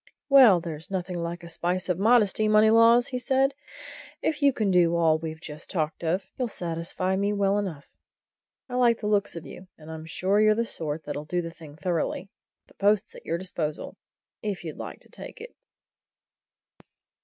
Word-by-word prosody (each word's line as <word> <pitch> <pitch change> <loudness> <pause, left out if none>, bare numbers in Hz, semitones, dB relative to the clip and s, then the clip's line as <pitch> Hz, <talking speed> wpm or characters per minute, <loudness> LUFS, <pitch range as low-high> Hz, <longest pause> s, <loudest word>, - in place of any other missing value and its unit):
"Well, 255 -10 +8
there's 160 -2 -7
nothing 180 -2 -3
like 170 +1 -5
a - - -8
spice 175 +2 -2
of 180 -1 -1
modesty, 215 -1 +3
Moneylaws," 230 +3 +5
said 270 0 +2 0.7
he. - - -2
"If 305 -1 -4
you 285 -1 +5
can 215 -6 0
do 170 -2 +4
all 160 -2 +3
we've 160 -1 -6
just 150 -2 -10
talked 160 -2 -2
of, 175 +4 0
you'll 250 - 0
satisfy 175 0 -3
me 200 +2 0
well 200 0 +2
enough. 165 -9 -6 0.8
I 250 - -10
like 240 -2 +4
the 215 - -6
looks 205 -3 +1
of 165 - -7
you, 185 - -11
and 155 0 -11
I'm 160 0 -8
sure 195 +5 +1
you're 215 0 +5
the 230 +1 0
sort 155 -6 -4
that'll 150 - -5
do 175 +2 -1
the 165 - -6
thing 155 -3 -13
thoroughly. 175 +3 -2 0.4
The - - -23
post's 205 0 +1
at - - -13
your 165 - 0
disposal, 170 -4 -4 0.5
if 205 -5 -4
you 160 -3 -5
like - - -8
to - - -18
take - - -10
it." 475 +2 -10
185 Hz, 185 wpm, -26 LUFS, 165-215 Hz, 0.8 s, Well